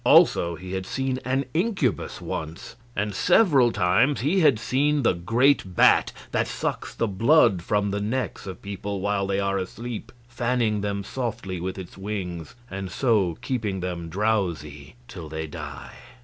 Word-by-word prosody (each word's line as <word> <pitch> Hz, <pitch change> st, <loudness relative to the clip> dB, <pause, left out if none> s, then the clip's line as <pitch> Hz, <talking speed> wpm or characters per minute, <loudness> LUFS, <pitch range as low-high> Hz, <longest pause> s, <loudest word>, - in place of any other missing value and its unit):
Also 85 Hz, 0 st, +5 dB
he 90 Hz, +3 st, -9 dB
had 95 Hz, 0 st, -3 dB
seen 135 Hz, -1 st, -1 dB
an 135 Hz, +2 st, 0 dB
incubus 170 Hz, -, 0 dB
once, 80 Hz, +1 st, -6 dB, 0.2 s
and 105 Hz, +1 st, -1 dB
several 145 Hz, -, +4 dB
times 115 Hz, +10 st, +2 dB
he 155 Hz, +9 st, +2 dB
had 145 Hz, -9 st, +5 dB
seen 140 Hz, +5 st, +1 dB
the -, -, +4 dB
great 115 Hz, +2 st, +2 dB
bat -, -, +5 dB, 0.2 s
that -, -, +1 dB
sucks -, -, -3 dB
the 115 Hz, -, 0 dB
blood 100 Hz, -, +4 dB
from 100 Hz, +2 st, 0 dB
the 100 Hz, +1 st, -2 dB
necks 115 Hz, 0 st, -3 dB
of 95 Hz, -, -8 dB
people 100 Hz, 0 st, -4 dB
while 100 Hz, 0 st, 0 dB
they 100 Hz, 0 st, 0 dB
are 100 Hz, 0 st, 0 dB
asleep, 115 Hz, +4 st, -6 dB, 0.2 s
fanning 120 Hz, -3 st, 0 dB
them 100 Hz, -1 st, -2 dB
softly 100 Hz, -6 st, -4 dB
with 95 Hz, +2 st, -4 dB
its 95 Hz, 0 st, -9 dB
wings 95 Hz, 0 st, -5 dB
and 95 Hz, -3 st, -5 dB
so 105 Hz, -10 st, +1 dB
keeping 110 Hz, -7 st, -2 dB
them 90 Hz, -2 st, -4 dB
drowsy 85 Hz, -7 st, -2 dB
till 85 Hz, -9 st, -8 dB
they 80 Hz, +1 st, -4 dB
die. 75 Hz, -, -8 dB
100 Hz, 160 wpm, -25 LUFS, 95-125 Hz, 0.2 s, Also